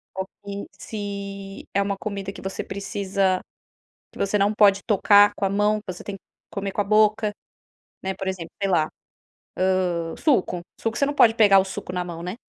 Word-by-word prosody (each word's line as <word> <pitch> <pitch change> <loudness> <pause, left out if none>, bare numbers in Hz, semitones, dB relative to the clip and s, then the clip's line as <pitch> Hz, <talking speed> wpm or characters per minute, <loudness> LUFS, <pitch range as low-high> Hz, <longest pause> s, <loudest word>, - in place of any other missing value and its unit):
ou 190 0 -2 0.2
que 200 0 -5
se 200 -2 -6
é 200 - +3
uma 200 0 -1
comida 200 -2 -4
que - - -11
você 190 0 -4
precisa 195 -1 -1 0.7
que - - -13
você 200 +1 +1
não 200 +1 +3
pode 200 -2 +5
tocar 205 -1 +6
com - - -2
a 195 - +2
mão, 210 +2 +2
que 185 - -3
você 175 - -10
tem 200 - -6
que - - -22 0.3
comer 195 -1 -4
com 205 - -1
a - - +2
boca, 215 +1 +3 0.7
né, 190 0 -2
por 190 0 -6
exemplo 180 -3 -4
sei 195 -1 +1
lá, 160 -3 +3 1.1
hã, 165 -1 -4
suco. 215 - +1 0.2
Suco, 225 0 -2
você 280 - +3
não 290 - -2
pode 225 -5 +6
pegar 200 -4 +6
o - - 0
suco 190 -1 -6
na 180 0 -1
mão, 170 -1 -7
né. 180 +2 -4
200 Hz, 200 wpm, -24 LUFS, 190-205 Hz, 1.1 s, tocar